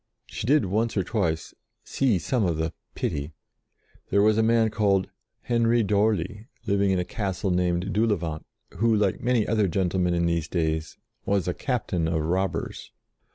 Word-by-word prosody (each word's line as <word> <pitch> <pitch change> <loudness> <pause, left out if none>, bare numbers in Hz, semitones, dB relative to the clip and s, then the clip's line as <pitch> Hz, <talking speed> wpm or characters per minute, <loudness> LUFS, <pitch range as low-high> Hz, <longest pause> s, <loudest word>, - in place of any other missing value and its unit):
She - - -6
did, 145 -4 +4
once 110 +4 0
or 95 - +2
twice, 85 -6 -2 0.3
see 130 -8 +1
some 120 +6 0
of 85 -4 0
the 80 +1 -2 0.2
"pity." 70 +2 -3 0.8
There 100 - +3
was 110 0 +4
a 110 - +3
man 115 0 +3
called 100 -3 +1 0.3
Henry 115 -1 +2
d'Orly, 105 0 0 0.2
living 100 0 +2
in 95 - +2
a 90 - -1
castle 95 -2 -2
named 90 +2 0
Doulevant, 95 -8 0 0.3
who, 115 0 +3
like 105 -3 +1
many 120 -3 +1
other 110 -3 +2
gentlemen 90 -1 0
in 85 0 +1
these 85 -2 0
days, 80 -2 -2 0.3
was 100 -3 0
a 90 - 0
captain 95 - -1
of 80 -2 0
robbers. 90 +1 -2
95 Hz, 160 wpm, -25 LUFS, 85-110 Hz, 0.8 s, did